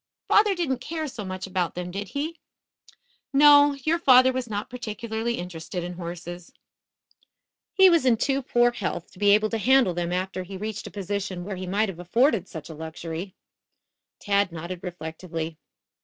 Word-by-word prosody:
"Father 415 -2 +4
didn't 285 -8 -1
care 315 +2 -4
so 240 -6 -7
much 185 -1 -5
about 185 -2 -2
them, 180 0 -5
did 200 +2 -4
he?" 310 - -4 0.9
"No, 290 0 +7
your 330 +4 +1
father 260 -4 +6
was 255 -2 -3
not 205 0 -3
particularly 230 -1 -4
interested 175 0 -5
in 180 +1 -5
horses. 175 0 -7 1.2
He 380 -1 +8
was 335 -5 +4
in 245 -3 +4
too 275 +3 0
poor 240 -1 +3
health 205 -7 -4
to - - -17
be 205 0 +4
able 215 0 0
to 225 - -1
handle 255 -4 +4
them 175 0 -2
after 185 +1 -2
he 190 +1 -8
reached 215 +2 -5
a - - -6
position 200 -2 -4
where 200 0 -4
he 185 0 -6
might 205 +4 +1
have 175 -3 -8
afforded 210 - +2
such 155 -3 -8
a 165 - -8
luxury." 160 +4 -6 0.8
Tad 200 -2 +1
nodded 170 +2 -6
reflectively. 165 -2 -6
200 Hz, 170 wpm, -25 LUFS, 180-250 Hz, 1.2 s, He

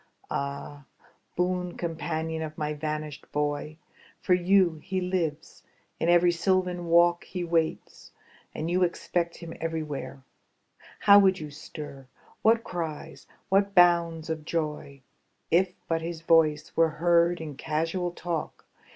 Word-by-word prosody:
Ah, 140 +1 -4 0.5
boon 180 0 -1
companion 160 -1 -3
of 155 -1 -6
my 150 0 -2
vanished 150 -1 -5
boy. 150 +1 -2 0.4
For 185 - +2
you 180 -2 +3
he 190 0 -2
lives; 180 -5 -3 0.4
in 165 - +1
every 175 0 +5
sylvan 180 0 0
walk 170 +1 +4
He 180 -2 -5
waits; 165 -2 -2 0.4
and 155 - -3
you 180 +1 +2
expect 170 -1 -1
him 165 -1 -8
everywhere. 155 -4 -4 0.8
How 200 0 +8
would 190 -2 +4
you 150 -3 -7
stir, 145 -2 -9 0.3
what 230 +1 +4
cries, 165 -6 -6 0.2
what 200 +1 +2
bounds 170 -2 +4
of 160 -1 -4
joy. 150 -4 -4 0.5
If 180 +2 +3
but 165 0 0
his 165 0 -5
voice 155 -2 +3
were 165 0 +4
heard 170 +1 +3
in 155 -3 -6
casual 165 +5 -1
talk. 175 -2 -5
165 Hz, 130 wpm, -27 LUFS, 155-175 Hz, 0.8 s, How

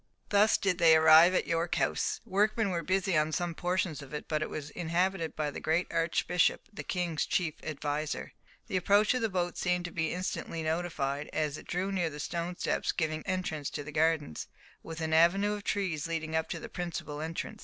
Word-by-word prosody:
Thus 210 +1 +4
did 190 -2 0
they 165 -2 +7
arrive 160 +3 +7
at - - +2
York 165 +1 0
House. - - 0
Workmen 210 0 +1
were 170 -2 -1
busy 190 0 0
on 155 0 +2
some 175 +1 -1
portions 175 -3 -1
of 140 +1 -8
it, 150 - -6
but 155 -1 -1
it - - -2
was 150 -1 -6
inhabited 175 0 -1
by 150 -1 -1
the - - -6
great 160 +3 +1
Archbishop, 165 +1 +1
the - - -6
king's 175 -4 -1
chief 165 -4 0
adviser. 150 0 -3 0.3
The 185 - -1
approach 200 +4 +4
of 255 - -1
the 225 - +1
boat 175 -2 -2
seemed 180 0 0
to 175 - -5
be 160 -1 -1
instantly 175 -2 -3
notified, 155 -3 -2
as 155 -2 0
it - - -14
drew 185 +3 -1
near 180 -4 0
the 150 -1 -9
stone 170 +3 -3
steps - - 0
giving 155 -2 -2
entrance 175 -6 -2
to 145 - -5
the 150 - -8
gardens, 155 - 0 0.3
with 165 0 -7
an 160 0 -1
avenue 190 +6 +4
of 205 -1 -5
trees 175 -8 -1
leading 160 -1 -3
up 160 0 0
to - - -3
the - - -7
principal 165 -4 -5
entrance. 165 +7 -5
170 Hz, 205 wpm, -30 LUFS, 155-185 Hz, 0.3 s, they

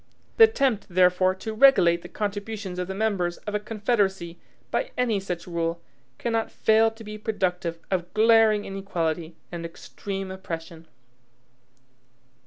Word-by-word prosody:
The 450 - +10
attempt, 275 - 0
therefore, 185 +1 +3
to 220 +4 -6
regulate 190 -9 +5
the 175 - -10
contributions 205 -2 -4
of 180 - -2
the 190 - -5
members 195 -5 0
of 210 - -4
a 210 - +1
confederacy 205 -5 -1 0.3
by - - -1
any 235 -5 +1
such 180 -3 -5
rule, 170 -1 -2 0.4
cannot 225 -1 -1
fail 220 +1 +3
to 225 0 -13
be 215 0 -8
productive 180 -5 -2
of 175 -2 -1
glaring 220 -1 +5
inequality 170 -4 -3 0.2
and 170 -1 -5
extreme 195 +3 -6
oppression. 165 -3 -7
195 Hz, 135 wpm, -25 LUFS, 175-220 Hz, 0.4 s, The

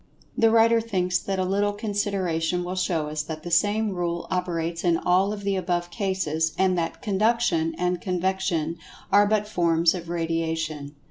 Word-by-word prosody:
The 225 - +4
writer 230 0 +4
thinks 185 -5 0
that 195 -1 -3
a 185 - 0
little 200 +2 +1
consideration 195 -5 -1
will 180 +1 -4
show 175 -4 -1
us 150 0 -2
that 155 0 -7
the 175 - -6
same 205 +5 +2
rule 175 -2 -2
operates 170 -2 -2
in 170 -2 +3
all 185 +4 +2
of 205 -1 -6
the 200 0 0
above 175 -1 -2
cases, 165 -5 -1
and 190 -1 +3
that 170 -2 -3
"Conduction" 205 -6 +1
and 180 0 -1
"Convection" 180 -3 -1 0.3
are 205 0 +6
but 210 0 +1
forms 170 -4 +2
of 170 -2 -7
Radiation. 160 -3 -2
180 Hz, 170 wpm, -25 LUFS, 165-200 Hz, 0.3 s, are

